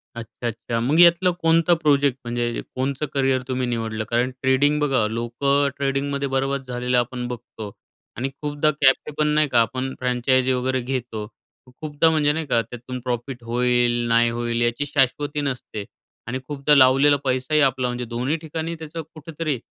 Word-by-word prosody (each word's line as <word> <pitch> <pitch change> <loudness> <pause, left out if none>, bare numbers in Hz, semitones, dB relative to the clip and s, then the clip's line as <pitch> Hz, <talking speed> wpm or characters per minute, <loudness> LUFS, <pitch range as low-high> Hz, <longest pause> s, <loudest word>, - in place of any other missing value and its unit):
अच्छा, 115 +1 -6
अच्छा. 115 0 -3
मग 140 +8 +1
यातलं 175 +1 +6
कोणतं 165 +1 +4
प्रोजेक्ट 140 -3 +2
म्हणजे 120 0 -2
कोणतं 135 +3 -2
करिअर 135 -2 +1
तुम्ही 130 -1 -1
निवडलं? 115 -2 -3
कारण 120 +3 0
ट्रेडिंग 140 +3 +2
बघा, 135 -6 +1
लोकं 120 +6 0
ट्रेडिंगमध्ये 140 0 -1
बरबाद 135 0 -1
झालेलं 125 0 -1
आपण 125 0 -1
बघतो 110 -3 -8 0.5
आणि 130 +3 -2
खूपदा 150 +1 +1
कॅप्ट 135 +2 +3
पण 155 - +2
नाही 150 0 +2
का 120 - +3
आपण 130 +3 -2
फ्रँचाइजी 130 +1 +1
वगैरे 130 +1 0
घेतो 120 -4 -4 0.4
खूपदा, 150 +5 0
म्हणजे 150 -2 +2
नाही 160 +1 -3
का 120 -5 +2
त्यातून 125 +2 -8
प्रॉफिट 125 0 -4
होईल, 120 +1 +2 0.2
नाही 115 0 +3
होईल 120 0 -2
याची 120 +5 0
शाश्वती 145 +1 0
नसते 125 -6 -4 0.4
आणि 130 +2 -3
खूपदा 145 0 +2
लावलेला 135 +2 +6
पैसाही 130 +4 +1
आपला, 130 -2 +2
म्हणजे 125 0 -3
दोन्ही 125 +6 -2
ठिकाणी 160 +1 -5
त्याचं 160 0 -7
कुठेतरी 155 -2 -4
130 Hz, 160 wpm, -22 LUFS, 120-145 Hz, 0.5 s, यातलं